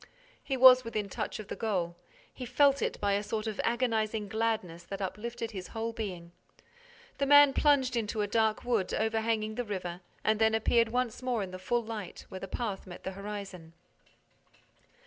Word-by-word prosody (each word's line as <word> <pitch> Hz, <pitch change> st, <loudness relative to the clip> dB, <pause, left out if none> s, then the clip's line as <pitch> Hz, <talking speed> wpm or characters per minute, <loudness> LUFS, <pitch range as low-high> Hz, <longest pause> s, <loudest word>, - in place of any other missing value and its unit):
He 270 Hz, -, -2 dB
was 255 Hz, 0 st, +9 dB
within 215 Hz, -3 st, -3 dB
touch 215 Hz, +2 st, -4 dB
of 215 Hz, -, -8 dB
the -, -, -5 dB
goal. 185 Hz, -7 st, -1 dB, 0.4 s
He 255 Hz, -, -8 dB
felt 275 Hz, +3 st, +4 dB
it -, -, -2 dB
by 200 Hz, -1 st, +1 dB
a 200 Hz, -, +1 dB
sort 215 Hz, +1 st, -3 dB
of 215 Hz, -2 st, -2 dB
agonizing 225 Hz, -3 st, 0 dB
gladness 215 Hz, -6 st, -1 dB
that 195 Hz, -, -6 dB
uplifted 225 Hz, +4 st, -4 dB
his 190 Hz, -4 st, -6 dB
whole 230 Hz, +1 st, -4 dB
being. 180 Hz, -6 st, -6 dB, 0.9 s
The 280 Hz, -, +1 dB
man 290 Hz, -1 st, +8 dB
plunged 270 Hz, -4 st, +3 dB
into 220 Hz, -1 st, -1 dB
a -, -, -1 dB
dark 220 Hz, 0 st, +1 dB
wood 230 Hz, -6 st, 0 dB
overhanging 220 Hz, 0 st, 0 dB
the 245 Hz, +2 st, -2 dB
river 180 Hz, -5 st, -5 dB, 0.2 s
and 215 Hz, 0 st, +2 dB
then 220 Hz, 0 st, +4 dB
appeared 230 Hz, +1 st, +3 dB
once 245 Hz, 0 st, -1 dB
more 245 Hz, -4 st, -1 dB
in 185 Hz, -, -7 dB
the 185 Hz, -, -7 dB
full 240 Hz, +5 st, 0 dB
light, 215 Hz, -5 st, -7 dB
where 190 Hz, -, -7 dB
the 195 Hz, -, -6 dB
path 200 Hz, -2 st, -4 dB
met 175 Hz, -, -10 dB
the 190 Hz, -, -3 dB
horizon. 195 Hz, -4 st, -7 dB
220 Hz, 185 wpm, -30 LUFS, 200-235 Hz, 0.9 s, was